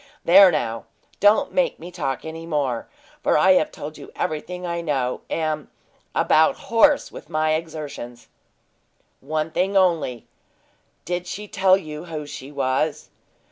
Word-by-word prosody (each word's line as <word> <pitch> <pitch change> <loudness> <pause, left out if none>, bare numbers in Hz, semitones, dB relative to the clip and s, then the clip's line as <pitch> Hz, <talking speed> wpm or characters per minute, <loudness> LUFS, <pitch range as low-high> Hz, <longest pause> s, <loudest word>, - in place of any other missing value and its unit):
There 190 +2 +8
now, 115 -7 -2 0.3
don't 215 +8 +4
make 270 -1 +1
me 175 +2 -9
talk 140 -7 -3
any 165 +1 -7
more, 140 -7 -1 0.3
for - - +3
I 185 +5 +5
have 180 -4 +3
told 150 +1 -8
you - - -11
everything 180 +2 -3
I 170 -1 -2
know, 135 -6 -1
and - - -1
am 155 -2 -2 0.4
about 160 +1 +4
hoarse 275 +6 +3
with - - -11
my 155 -1 +1
exertions." 150 -7 -6 0.9
"One 155 +3 -2
thing 195 +4 +1
only 165 - +1 0.8
did 180 0 -3
she 210 +4 -6
tell 190 -1 +4
you 155 -3 -8
who 155 -3 -6
she 145 -1 -9
was?" 145 +2 -1
155 Hz, 145 wpm, -23 LUFS, 145-180 Hz, 0.9 s, There